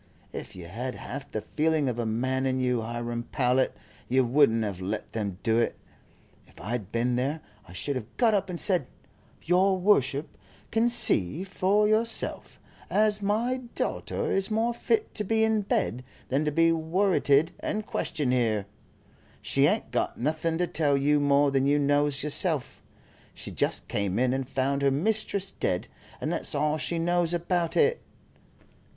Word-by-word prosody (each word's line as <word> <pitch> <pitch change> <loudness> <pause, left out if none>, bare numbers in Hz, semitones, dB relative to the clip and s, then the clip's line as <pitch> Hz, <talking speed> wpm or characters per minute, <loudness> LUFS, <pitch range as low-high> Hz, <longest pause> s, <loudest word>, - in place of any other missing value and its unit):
If - - -7
you 90 -2 -9
had 120 +9 -5
half 135 +2 -7
the 110 - -3
feeling 155 +1 0
of 120 -2 -2
a 115 - -1
man 130 +4 0
in 130 0 0
you, 125 -2 +1
Hiram 120 +1 -4
Powlett, 130 -1 +1 0.3
you 130 +1 +3
wouldn't 120 -3 +3
have 100 -4 -4
let 100 +4 -4
them 100 -5 -3
do 115 -1 +2
it. 115 - 0 0.7
If - - -19
I 95 +7 -6
had 110 -6 -3
been 120 +1 0
there 140 +5 -1 0.3
I - - -12
should 140 +9 -3
have 120 -3 -7
got 230 -3 +4
up 195 -2 0
and 175 -2 -4
said: 180 -9 +2 0.6
'Your 185 +3 +3
worship 150 -7 +1 0.4
can 230 +2 +3
see 150 - 0
for 195 +2 +2
yourself 225 +2 -1 0.3
as 210 0 +2
my 225 +6 0 0.2
daughter - - -2
is 195 +1 +1
more 225 +2 +1
fit 435 - 0
to 210 - -2
be 220 +2 +2
in 220 -1 +2
bed 125 - -1 0.3
than 140 +4 +1
to 150 - +1
be 165 +2 +4
worrited 165 -2 +2
and 215 0 -3
questioned 140 -11 -1
here. 110 -5 +1 0.8
She - - +3
ain't - - -1
got - - -1
nothing 155 +5 -1
to 180 - +1
tell 145 -5 +1
you 145 +2 +3
more 145 0 +3
than 135 0 +2
you 145 +1 +3
knows 145 0 +1
yourself. 150 -1 0 0.5
She - - -7
just - - 0
came 100 -2 -1
in 125 +1 +2
and 135 -1 -3
found 140 +1 0
her 140 - +4
mistress 195 +5 0
dead, 90 - -2 0.3
and - - -2
that's - - -2
all 150 +2 +1
she 170 - -2
knows 175 0 +1
about 175 -1 -1
it.'" 460 +2 +3
145 Hz, 170 wpm, -27 LUFS, 125-185 Hz, 0.8 s, got